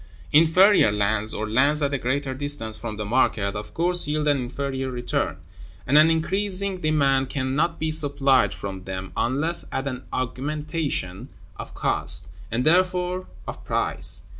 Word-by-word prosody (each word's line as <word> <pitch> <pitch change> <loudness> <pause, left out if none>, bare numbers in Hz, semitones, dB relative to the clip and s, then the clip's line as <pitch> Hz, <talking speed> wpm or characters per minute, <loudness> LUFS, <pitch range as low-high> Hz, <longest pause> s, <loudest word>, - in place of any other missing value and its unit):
Inferior 165 - +5
lands, 105 +1 0
or 110 - -2
lands 140 +7 +3
at 140 0 0
a 140 - -1
greater 135 +2 -2
distance 130 -5 -1
from 110 -3 -3
the 105 - -4
market, 105 -3 +1
of 105 0 -7
course 175 -1 +2
yield 150 0 -1
an 145 -1 +3
inferior 135 +1 -4
return, 125 -1 -2 0.5
and 135 - 0
an 155 +2 +7
increasing 190 +3 0
demand 140 -4 +1
can 130 -1 -2
not 165 +3 0
be 160 0 -1
supplied 140 -4 +3
from 95 -1 -7
them 95 0 -6
unless 145 +8 0
at 135 - -3
an 130 -2 -5
augmentation 145 - -3 0.3
of - - -9
cost, - - 0 0.2
and 120 +3 -2
therefore 180 +2 +1 0.2
of - - -7
price. - - 0
140 Hz, 155 wpm, -23 LUFS, 120-160 Hz, 0.5 s, an